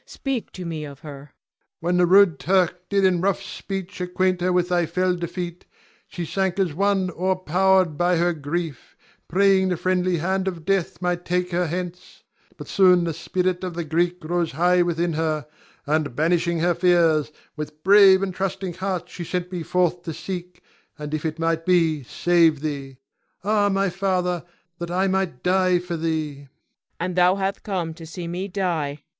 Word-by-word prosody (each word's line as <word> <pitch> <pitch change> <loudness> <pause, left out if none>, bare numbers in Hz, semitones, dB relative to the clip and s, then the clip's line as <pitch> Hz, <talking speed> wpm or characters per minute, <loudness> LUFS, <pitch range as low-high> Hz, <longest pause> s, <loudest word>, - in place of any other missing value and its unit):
Speak 270 -4 -4
to 185 - -7
me 160 -2 -4
of 140 -2 -10
her. 145 -3 -8
Ion. 145 +2 -15 0.5
When 175 +2 0
the 180 -1 +4
rude 190 -4 +5
Turk 180 -1 +1
did 200 -1 +2
in 180 -2 +2
rough 195 0 0
speech 195 -1 -6
acquaint 180 0 0
her 180 +1 +1
with 180 0 +1
thy 175 -2 +1
fell 180 +2 +1
defeat, 175 0 -5 0.4
she 175 - -5
sank 190 +2 -1
as 185 -6 0
one 195 +1 +1
o'erpowered 185 -1 +2
by 175 +1 +2
her 175 +1 +2
grief, 155 -1 -5 0.3
praying 190 0 +3
the 180 - 0
friendly 185 0 +1
hand 190 +4 -1
of 170 -4 -4
death 190 -2 -1
might 175 0 -1
take 180 0 -1
her 175 0 0
hence; 180 +1 -6 0.3
but - - -9
soon 180 -2 +5
the 165 -1 -2
spirit 180 +3 -1
of 180 -2 -4
the 170 - -2
Greek 170 +3 0
rose 170 -1 -1
high 180 +4 +3
within 170 -1 0
her, 155 -1 -1 0.4
and, 150 -3 0
banishing 170 +2 +1
her 175 +1 +3
fears, 170 -4 +3 0.2
with 150 0 -7
brave 195 -1 +7
and 190 -1 -2
trusting 190 -1 -3
heart 185 -1 -3
she 180 0 -7
sent 180 +1 -3
me 180 -2 -4
forth 180 +1 0
to 165 -3 -6
seek, 180 +1 -7 0.3
and 150 0 -6
if 155 +1 -1
it 155 0 -5
might 165 0 0
be, 165 -4 +2
save 165 +2 +2
thee. 140 -3 -5 0.5
Ah, 205 0 +2
my 195 0 +1
father, 180 -2 -1 0.4
that 170 0 -4
I 185 +2 +1
might 190 -8 -1
die 185 0 +3
for 175 -1 -4
thee! 160 -2 -2
Cleon. 140 0 -15 0.5
And 180 +1 -2
thou 180 +1 +4
hath 195 +1 -2
come 180 -6 -3
to 165 0 -11
see 170 +1 -6
me 180 +3 -4
die! 165 -7 -2
175 Hz, 185 wpm, -23 LUFS, 165-185 Hz, 0.5 s, brave